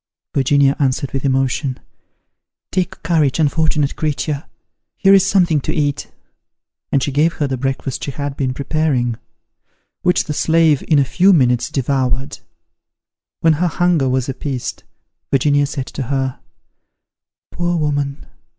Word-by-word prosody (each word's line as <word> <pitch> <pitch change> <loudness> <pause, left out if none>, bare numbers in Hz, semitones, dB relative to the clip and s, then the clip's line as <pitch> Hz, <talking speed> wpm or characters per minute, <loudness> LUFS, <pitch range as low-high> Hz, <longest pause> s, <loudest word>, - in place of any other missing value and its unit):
Virginia 140 0 +3
answered 135 -1 0
with 135 - -3
emotion, 135 0 0 0.9
"Take 185 -3 -2
courage, 155 -5 +2
unfortunate 155 -2 +1
creature! 150 -1 -2 0.5
here 195 0 +5
is 195 -2 +6
something 180 -6 +2
to - - -3
eat;" 145 -3 -1 0.8
and 135 - +2
she 145 - -1
gave 155 +5 +2
her 150 - -1
the 135 -1 -2
breakfast 135 0 -3
she - - -3
had 140 0 -4
been 130 -2 -1
preparing, 140 -5 0 0.8
which 180 0 +2
the 150 - -4
slave 160 -1 +3
in 155 - +4
a 140 - +4
few 185 +8 +4
minutes 125 -6 +2
devoured. 135 0 -1 1.0
When 165 -1 +4
her 175 +4 0
hunger 170 -5 +1
was 130 -1 0
appeased, 135 -1 -4 0.5
Virginia 145 +1 +2
said 140 -2 -4
to 140 - -7
her, 130 0 -2 1.1
"Poor 175 0 -1
woman! 145 -2 -2
145 Hz, 135 wpm, -18 LUFS, 135-160 Hz, 1.1 s, is